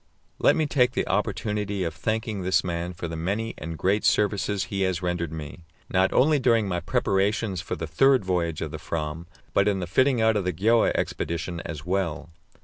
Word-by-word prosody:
Let -, -, +5 dB
me 155 Hz, -, +1 dB
take 125 Hz, -4 st, +2 dB
the -, -, -1 dB
opportunity 105 Hz, 0 st, -1 dB
of 85 Hz, -2 st, -2 dB
thanking 110 Hz, +3 st, -2 dB
this 95 Hz, 0 st, +2 dB
man 85 Hz, -1 st, -3 dB
for 85 Hz, -1 st, -5 dB
the 80 Hz, -, -5 dB
many 100 Hz, +8 st, -2 dB
and 80 Hz, +1 st, -6 dB
great 100 Hz, +5 st, +1 dB
services 100 Hz, -1 st, +1 dB
he 100 Hz, -1 st, -4 dB
has 95 Hz, -2 st, 0 dB
rendered 90 Hz, -2 st, -1 dB
me, 80 Hz, 0 st, -7 dB, 0.3 s
not 95 Hz, +1 st, +3 dB
only 145 Hz, +3 st, +4 dB
during 115 Hz, -5 st, +3 dB
my 90 Hz, -2 st, -1 dB
preparations 95 Hz, 0 st, 0 dB
for -, -, -4 dB
the 80 Hz, -, -4 dB
third 130 Hz, -, +3 dB
voyage 85 Hz, -4 st, -1 dB
of -, -, -3 dB
the -, -, -6 dB
Fram, 80 Hz, +1 st, -4 dB, 0.3 s
but 100 Hz, -, +3 dB
in 100 Hz, -2 st, +1 dB
the 90 Hz, -, -2 dB
fitting 130 Hz, +8 st, +2 dB
out 110 Hz, 0 st, +3 dB
of 105 Hz, -, +1 dB
the 90 Hz, 0 st, -1 dB
Gjöa 110 Hz, +7 st, +3 dB
expedition 85 Hz, +1 st, -2 dB
as 75 Hz, -3 st, -6 dB
well. 90 Hz, -3 st, -2 dB
95 Hz, 200 wpm, -25 LUFS, 85-105 Hz, 0.3 s, Let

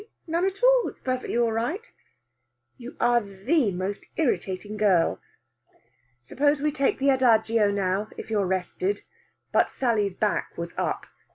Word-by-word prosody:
None 340 Hz, +2 st, 0 dB
at 390 Hz, +4 st, -3 dB
all. -, -, +5 dB
It's -, -, -9 dB
all 255 Hz, -, -1 dB
perfectly 255 Hz, -2 st, -3 dB
right." 240 Hz, -, -1 dB, 0.8 s
"You 245 Hz, +1 st, -10 dB
are 240 Hz, 0 st, +3 dB
the 210 Hz, -, 0 dB
most 190 Hz, +3 st, -4 dB
irritating 210 Hz, -, -1 dB
girl." 195 Hz, -6 st, +2 dB, 1.0 s
"Suppose 285 Hz, -, +1 dB
we 300 Hz, +1 st, +1 dB
take 280 Hz, -2 st, +1 dB
the 275 Hz, +1 st, +3 dB
adagio 225 Hz, -4 st, +3 dB
now 200 Hz, +1 st, -1 dB
if -, -, -8 dB
you're 205 Hz, -3 st, +1 dB
rested." 190 Hz, +2 st, -1 dB, 0.5 s
But -, -, +3 dB
Sally's 210 Hz, -7 st, 0 dB
back 210 Hz, 0 st, -1 dB
was 170 Hz, 0 st, -5 dB
up. -, -, -2 dB
225 Hz, 145 wpm, -26 LUFS, 200-275 Hz, 1.0 s, all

